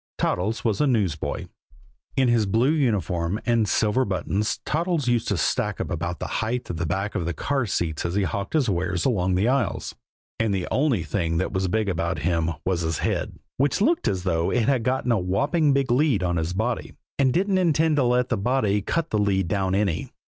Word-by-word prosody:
Toddles 105 +7 -1
was 110 +3 +1
a 150 - +3
newsboy. 100 - -1 0.7
In 130 -1 +4
his 115 -3 +2
blue 115 +8 +2
uniform 100 - 0
and 115 -3 +2
silver 110 +7 +2
buttons, 100 +1 -1
Toddles 165 -3 0
used 120 -1 +1
to 100 - 0
stack - - 0
up - - -3
about 85 +1 -3
the - - -4 0.2
height 120 0 -2
of 85 - -5
the 85 -1 -2
back 95 +5 -2
of 85 - -2
the 85 - -2
car 135 - -1
seats 80 -5 -2
as 85 +1 -2
he 100 - +2
hawked 100 +3 -3
his 150 -5 +2
wares 90 -2 -1
along 95 -7 +1
the 100 +5 +2
aisles; 125 -8 0 0.5
and 110 -3 +1
the 90 -2 -2
only 130 - +2
thing 80 0 -1
that 95 - -1
was 95 -1 0
big 110 +3 0
about 85 -1 -1
him 85 -1 +1 0.2
was 90 -2 0
his 80 -1 -1
head, - - -2 0.2
which 140 +6 +1
looked 320 +11 +2
as 95 -2 -1
though 85 -3 0
it 120 -2 +1
had 135 -4 +2
got 130 +3 -1
a 115 - +3
whopping 140 - +1
big 135 -2 +1
lead 125 -6 +2
on 85 -1 0
his 80 +2 -1
body 110 +5 -2 0.2
and 135 -2 +4
didn't 190 +5 +1
intend 160 -3 +2
to 140 - +3
let 125 0 +2
the 115 - 0
body 105 -2 +1
cut 165 +10 -2
the 105 - +1
lead 95 -3 +1
down 95 0 0
any. 100 -5 -1
105 Hz, 215 wpm, -24 LUFS, 90-130 Hz, 0.7 s, In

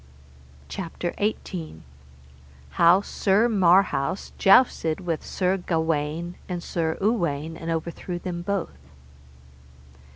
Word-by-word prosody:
CHAPTER 175 -1 -5
XVIII. 180 - -3 0.9
How 175 +3 +5
Sir 205 +2 +2
Marhaus 185 -6 +2
jousted 190 -6 +4
with 170 -4 -3
Sir 185 0 0
Gawaine 165 -1 -2
and 175 -2 -4
Sir 160 -2 -2
Uwaine, 165 -8 -1
and 165 0 -6
overthrew 170 +2 -3
them 175 -1 -5
both. 175 - -3
175 Hz, 95 wpm, -25 LUFS, 160-190 Hz, 0.9 s, How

